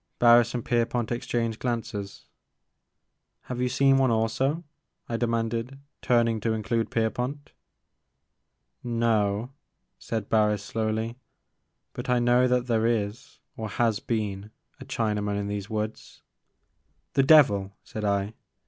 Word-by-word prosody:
'' -, -, -49 dB
Barris 120 Hz, 0 st, +6 dB
and 120 Hz, -, -3 dB
Pierpont 120 Hz, -1 st, 0 dB
exchanged 115 Hz, -2 st, -2 dB
glances. 115 Hz, -5 st, -4 dB, 1.2 s
Have 125 Hz, -1 st, -5 dB
you 125 Hz, -, +1 dB
seen 135 Hz, +1 st, +4 dB
one 130 Hz, -1 st, +3 dB
also? 130 Hz, +8 st, 0 dB, 0.2 s
" -, -, -53 dB
I 115 Hz, -, -3 dB
demanded, 115 Hz, +2 st, -1 dB, 0.2 s
turn 120 Hz, -1 st, +3 dB
ing 115 Hz, -1 st, -1 dB
to 110 Hz, +1 st, 0 dB
include 110 Hz, +1 st, -1 dB
Pierpont. 125 Hz, +6 st, -2 dB, 1.3 s
No," 115 Hz, -1 st, 0 dB, 0.5 s
said 110 Hz, -3 st, -4 dB
Barris 105 Hz, -2 st, +2 dB
slowly; 110 Hz, +2 st, -2 dB, 0.8 s
but -, -, -6 dB
I 125 Hz, -, +3 dB
know 120 Hz, +1 st, +4 dB
that 125 Hz, -1 st, +1 dB
there 115 Hz, -2 st, +1 dB
is, 110 Hz, +1 st, -2 dB, 0.2 s
or 110 Hz, -1 st, -5 dB
has 110 Hz, 0 st, +1 dB
been, 105 Hz, -4 st, -3 dB, 0.3 s
a -, -, -9 dB
Chinaman 105 Hz, -2 st, -1 dB
in 100 Hz, 0 st, -2 dB
these 100 Hz, -1 st, -4 dB
woods." 110 Hz, 0 st, -5 dB, 0.5 s
'* -, -, -46 dB
The 140 Hz, -, +4 dB
devil!" 115 Hz, -10 st, +5 dB
said 110 Hz, -, -7 dB
I. 100 Hz, +1 st, 0 dB
115 Hz, 135 wpm, -26 LUFS, 105-120 Hz, 1.3 s, Barris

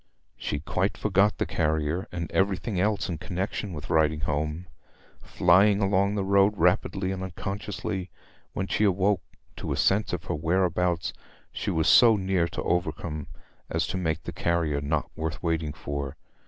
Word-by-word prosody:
She 75 Hz, -, -3 dB
quite 90 Hz, +5 st, -1 dB
forgot 105 Hz, 0 st, +2 dB
the -, -, 0 dB
carrier, 80 Hz, +4 st, 0 dB
and 85 Hz, -2 st, -4 dB
everything 95 Hz, +1 st, 0 dB
else 105 Hz, +1 st, +1 dB
in 85 Hz, -5 st, -4 dB
connexion 95 Hz, +3 st, -3 dB
with 75 Hz, -3 st, -7 dB
riding 80 Hz, -1 st, +2 dB
home. 75 Hz, +3 st, -2 dB, 0.6 s
Flying 100 Hz, +4 st, +4 dB
along 100 Hz, 0 st, +2 dB
the 100 Hz, -, 0 dB
road 100 Hz, +1 st, +4 dB
rapidly 95 Hz, +2 st, +1 dB
and 95 Hz, -1 st, -4 dB
unconsciously, 95 Hz, 0 st, -4 dB, 0.4 s
when 95 Hz, -, -2 dB
she 105 Hz, -, 0 dB
awoke 100 Hz, -1 st, +2 dB, 0.4 s
to -, -, -4 dB
a -, -, -1 dB
sense 105 Hz, +3 st, +2 dB
of 90 Hz, -1 st, -3 dB
her 85 Hz, -, -3 dB
whereabouts 85 Hz, +1 st, 0 dB, 0.4 s
she -, -, -3 dB
was 80 Hz, -1 st, +1 dB
so 115 Hz, -3 st, +7 dB
near 95 Hz, -3 st, +1 dB
to -, -, -5 dB
Overcombe 85 Hz, -4 st, -2 dB, 0.4 s
as 80 Hz, -1 st, 0 dB
to 95 Hz, -, -3 dB
make 80 Hz, -2 st, -1 dB
the -, -, -6 dB
carrier 80 Hz, -4 st, 0 dB
not 75 Hz, +1 st, -1 dB
worth 80 Hz, -1 st, -4 dB
waiting 80 Hz, -3 st, 0 dB
for. 70 Hz, -2 st, -5 dB
90 Hz, 160 wpm, -27 LUFS, 80-95 Hz, 0.6 s, so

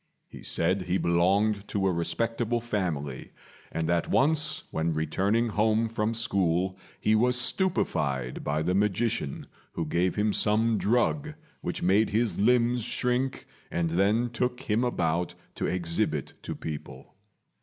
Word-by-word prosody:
He -, -, -12 dB
said 90 Hz, +4 st, 0 dB
he 90 Hz, +1 st, 0 dB
belonged 100 Hz, +5 st, +2 dB
to 100 Hz, -2 st, -1 dB
a 95 Hz, -, +3 dB
respectable 115 Hz, +7 st, -1 dB
family, 85 Hz, -, -3 dB, 0.4 s
and 80 Hz, -1 st, -2 dB
that 85 Hz, -1 st, 0 dB
once 155 Hz, +3 st, +2 dB
when 80 Hz, 0 st, -1 dB
returning 100 Hz, +9 st, +1 dB
home 110 Hz, +2 st, +2 dB
from 110 Hz, 0 st, -1 dB
school 95 Hz, -5 st, +1 dB, 0.2 s
he 110 Hz, -, +2 dB
was 125 Hz, +3 st, +3 dB
stupified 70 Hz, -, 0 dB
by 75 Hz, +2 st, 0 dB
the 90 Hz, +3 st, 0 dB
magician, 105 Hz, -, 0 dB, 0.3 s
who 80 Hz, -, -2 dB
gave 85 Hz, +4 st, 0 dB
him 105 Hz, 0 st, +1 dB
some 110 Hz, +1 st, +2 dB
drug 145 Hz, +7 st, +1 dB, 0.3 s
which 90 Hz, -, -4 dB
made 100 Hz, +4 st, +3 dB
his 110 Hz, -4 st, 0 dB
limbs 120 Hz, +2 st, +3 dB
shrink, 125 Hz, +4 st, -1 dB, 0.2 s
and 85 Hz, -1 st, -1 dB
then 105 Hz, +7 st, +2 dB
took 125 Hz, +1 st, -2 dB
him 115 Hz, -2 st, 0 dB
about 85 Hz, -7 st, 0 dB, 0.2 s
to -, -, -2 dB
exhibit 85 Hz, -2 st, -1 dB
to -, -, -5 dB
people. 75 Hz, -4 st, -8 dB
105 Hz, 140 wpm, -28 LUFS, 85-115 Hz, 0.4 s, a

